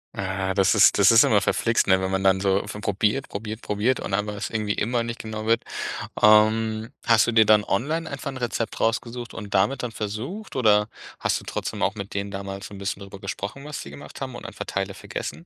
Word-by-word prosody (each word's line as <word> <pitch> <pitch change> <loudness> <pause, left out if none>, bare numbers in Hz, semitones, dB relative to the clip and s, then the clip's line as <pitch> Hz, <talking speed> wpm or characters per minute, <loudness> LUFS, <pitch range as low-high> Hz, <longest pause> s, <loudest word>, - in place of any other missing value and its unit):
Ah 95 0 -2
das 95 +1 +3
ist 105 - +6
das 100 - +7
ist 115 0 +8
immer 105 -2 +4
verflixt, 115 +4 +1
ne? 95 0 +4
Wenn 95 - -1
man 95 0 0
dann 95 -1 +3
so 100 +1 +1
von 105 0 -7
probiert, 105 +7 0
probiert, 110 +2 -6
probiert 105 +5 0
und 95 - -5
einfach 105 +1 0
es 100 - -4
irgendwie 105 -2 -1
immer 120 +2 0
nicht 115 0 -5
genau 110 0 -5
wird. 115 +1 +2 0.6
Ähm, 110 +1 +4
hast 115 -3 +5
du 120 - +2
dir 110 -1 +5
dann 105 -1 +5
online 155 +12 -1
einfach 140 0 -5
'n 135 - -7
Rezept 120 -2 -3
rausgesucht 120 +1 -1
und 105 -3 -7
damit 125 +8 +2
dann 120 -2 -4
versucht 125 - -5
oder 105 -3 +4 0.3
hast - - 0
du - - -14
trotzdem - - -4
auch 100 - +1
mit 100 -1 -7
denen 100 0 -3
damals 100 0 -6
so 105 - -13
'n - - -8
bisschen 100 0 -3
darüber 100 0 -10
gesprochen, 100 +7 -5
was 150 -1 -6
sie - - -9
gemacht 70 +1 -11
haben - - -5
und - - -9
einfach - - -7
Teile 95 0 -3
vergessen? 100 - -6
105 Hz, 230 wpm, -24 LUFS, 100-115 Hz, 0.6 s, ist